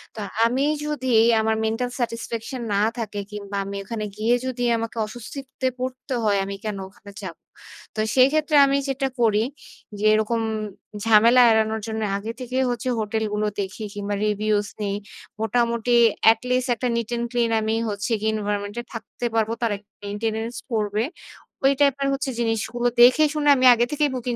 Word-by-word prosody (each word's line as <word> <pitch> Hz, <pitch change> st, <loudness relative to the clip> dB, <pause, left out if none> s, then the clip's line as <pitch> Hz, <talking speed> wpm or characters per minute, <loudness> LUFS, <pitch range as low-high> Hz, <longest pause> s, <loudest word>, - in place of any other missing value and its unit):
তো -, -, -7 dB, 0.3 s
আমি 255 Hz, +4 st, +1 dB, 0.2 s
যদি, 260 Hz, -4 st, -1 dB, 0.3 s
আমার 220 Hz, 0 st, +1 dB
মেন্টাল 225 Hz, +3 st, -1 dB
স্যাটিসফ্যাকশন 230 Hz, +1 st, -4 dB
না 200 Hz, -, +2 dB, 0.2 s
থাকে, 210 Hz, -3 st, -4 dB
কিংবা 200 Hz, -1 st, -6 dB
আমি 200 Hz, 0 st, -5 dB
ওখানে 215 Hz, +1 st, -4 dB
গিয়ে 225 Hz, +3 st, +2 dB
যদি 255 Hz, -1 st, -3 dB
আমাকে 230 Hz, 0 st, -5 dB
অস্বস্তিতে 260 Hz, +4 st, -6 dB
পড়তে 255 Hz, +1 st, -4 dB
হয় 205 Hz, -2 st, +2 dB
আমি 200 Hz, 0 st, -5 dB
কেন 210 Hz, -2 st, -3 dB
ওখানে 200 Hz, +1 st, -15 dB
যাবো? -, -, -8 dB, 0.6 s
তো 215 Hz, -, -4 dB, 0.2 s
সেই 255 Hz, 0 st, +7 dB
ক্ষেত্রে 310 Hz, 0 st, +1 dB
আমি 275 Hz, 0 st, +2 dB
যেটা 270 Hz, 0 st, 0 dB
করি 215 Hz, -1 st, +3 dB, 0.6 s
যে 215 Hz, -, -1 dB
এরকম 220 Hz, +2 st, +1 dB, 0.6 s
ঝামেলা 225 Hz, +3 st, +6 dB
এড়ানোর 220 Hz, 0 st, +1 dB
জন্য 220 Hz, 0 st, -3 dB, 0.2 s
আগে 215 Hz, +3 st, -5 dB
থেকেই 255 Hz, +1 st, -1 dB
হচ্ছে 245 Hz, +1 st, -2 dB
হোটেল 220 Hz, +1 st, -1 dB
গুলো 210 Hz, 0 st, 0 dB
দেখি 195 Hz, +3 st, -6 dB
কিংবা 205 Hz, 0 st, -3 dB
রিভিউজ 210 Hz, 0 st, 0 dB, 0.2 s
নেই। 200 Hz, 0 st, -1 dB, 0.5 s
মোটামুটি 235 Hz, +1 st, +1 dB, 0.3 s
অ্যাট 225 Hz, 0 st, +7 dB
লিস্ট 255 Hz, +1 st, +1 dB
একটা 250 Hz, +2 st, -2 dB
নিট 230 Hz, -1 st, -3 dB
অ্যান্ড 235 Hz, 0 st, -1 dB
ক্লিন 240 Hz, -2 st, +1 dB
আমি 220 Hz, +1 st, 0 dB
হচ্ছে 205 Hz, +3 st, -3 dB, 0.2 s
এনভায়রনমেন্ট 205 Hz, -1 st, -3 dB
এ -, -, -13 dB
থাকতে 230 Hz, +1 st, -6 dB
পারব। 220 Hz, -1 st, +2 dB
তার 230 Hz, -2 st, +1 dB
একটা 205 Hz, +1 st, -25 dB
মেইনটেন্যান্স 220 Hz, +3 st, -3 dB, 0.2 s
পড়বে। 215 Hz, 0 st, 0 dB, 0.6 s
ওই 270 Hz, -, +6 dB
টাইপের 280 Hz, -1 st, +3 dB
হচ্ছে 270 Hz, 0 st, -2 dB
জিনিসগুলো 235 Hz, +1 st, -1 dB
দেখে 255 Hz, +6 st, +7 dB
শুনে 295 Hz, -1 st, +1 dB
আমি 260 Hz, -1 st, +2 dB
আগে 240 Hz, +1 st, +2 dB
থেকেই 295 Hz, -1 st, +1 dB
বুকিং 245 Hz, -1 st, -3 dB
225 Hz, 170 wpm, -23 LUFS, 215-250 Hz, 0.6 s, সেই